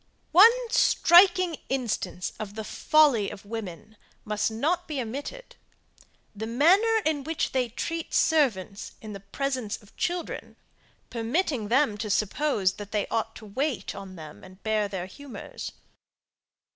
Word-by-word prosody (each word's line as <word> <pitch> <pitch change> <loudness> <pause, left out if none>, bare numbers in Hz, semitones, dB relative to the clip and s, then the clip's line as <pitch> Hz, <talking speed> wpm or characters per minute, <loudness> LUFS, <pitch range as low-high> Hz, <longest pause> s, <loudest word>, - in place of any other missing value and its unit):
One 390 +8 +9 0.2
striking 365 -6 +5
instance 220 -8 -2
of 205 -1 -6
the 220 - -4
folly 275 -4 +3
of 195 - -10
women 215 -1 -7 0.3
must 210 0 0
not 320 +11 -1
be 300 -3 -3
omitted. 280 - -6 0.8
The 220 +2 -5
manner 385 - +4
in 305 -3 0
which 320 +2 -2
they 255 -2 0
treat 330 +7 -4
servants 245 - +1
in 215 -1 -8
the 200 - -7
presence 250 +2 -3
of 205 - -21
children, 350 -1 -3 0.6
permitting 235 - -1
them 240 -2 +2
to 215 0 -3
suppose, 210 -1 +1
that 205 0 -8
they 210 -2 0
ought 225 0 -2
to 220 - -11
wait 260 +5 -2
on 190 -1 -9
them, 155 -3 -11
and 185 +1 -15
bear 215 -1 +1
their 190 -3 -4
humours. 275 +7 -8
230 Hz, 140 wpm, -27 LUFS, 205-310 Hz, 0.8 s, One